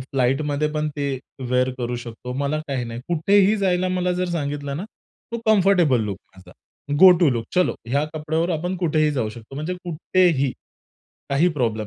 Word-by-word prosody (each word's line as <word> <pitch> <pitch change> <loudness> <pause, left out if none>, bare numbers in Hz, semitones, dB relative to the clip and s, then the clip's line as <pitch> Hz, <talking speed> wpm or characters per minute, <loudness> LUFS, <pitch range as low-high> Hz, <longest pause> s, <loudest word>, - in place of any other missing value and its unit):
फ्लाईटमध्ये 140 +3 0
पण 155 0 -1
ते 140 -2 -2 0.3
वेअर 125 0 +2
करू 120 0 -2
शकतो. 120 +1 -7
मला 140 +3 -1
काही 130 -3 -2
नाही. 115 0 -6
कुठेही 195 +5 +3
जायला 185 -2 +1
मला 180 0 0
जर 180 - 0
सांगितलं 145 -3 -3
ना, 180 - -4 0.5
तो 235 - -2
कम्फरटेबल 185 - +4
लूक 100 -2 -4 0.2
माझा, 95 - -15 0.5
गो-टू 180 -5 +7
लूक 115 -2 -2
चलो 180 0 +2
ह्या 140 +4 +1
कपड्यावर 160 +3 -1
आपण 175 +3 -2
कुठेही 155 -3 +1
जाऊ 120 -6 -1
शकतो, 115 +4 -11
म्हणजे 155 +6 -3
कुठेही 170 -4 +1 0.8
काही 145 +6 +3
प्रॉब्लेम 115 -9 -1
150 Hz, 160 wpm, -22 LUFS, 130-180 Hz, 0.8 s, गो-टू